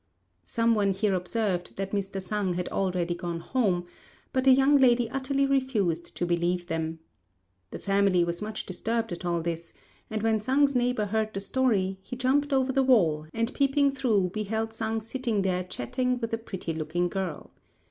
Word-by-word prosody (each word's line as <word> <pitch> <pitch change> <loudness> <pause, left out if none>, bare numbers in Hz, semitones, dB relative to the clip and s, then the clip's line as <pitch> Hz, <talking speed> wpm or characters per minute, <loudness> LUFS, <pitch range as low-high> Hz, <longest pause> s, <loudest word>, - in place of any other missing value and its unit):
Some 230 0 +2
one 200 -3 +2
here 195 +1 +1
observed, 185 0 -1
that 195 0 -3
Mr. 195 -1 -2
Sang 195 -1 -1
had 180 0 -2
already 180 -3 0
gone 170 -1 -4
home, 185 -3 0 0.5
but 260 0 +1
the 265 - +8
young 270 +2 +5
lady 245 -2 +4
utterly 270 +1 0
refused 230 -12 0
to 175 - 0
believe 175 +1 0
them. 160 -1 -3 0.7
The - - -6
family 195 -3 +2
was 170 0 -2
much 215 0 -4
disturbed 225 +5 -2
at 175 +1 -5
all 170 -1 0
this; 170 0 -4 0.4
and 215 -1 -3
when 220 -1 +2
Sang's 275 +4 +3
neighbour 245 -3 +1
heard 215 +1 -1
the - - -1
story, 200 -4 0
he 240 +6 -7
jumped 275 +4 +1
over 265 -1 +2
the 270 - +3
wall, 170 -13 +3
and 230 - -1
peeping 280 0 +3
through 220 -9 +1
beheld 220 +1 -2
Sang 225 0 -2
sitting 225 -2 -1
there 185 -1 0
chatting 250 +7 -2
with 230 -1 -4
a 225 - 0
pretty 190 -7 -5
looking 160 +3 -1
girl. 185 -4 -4
210 Hz, 180 wpm, -27 LUFS, 180-250 Hz, 0.7 s, the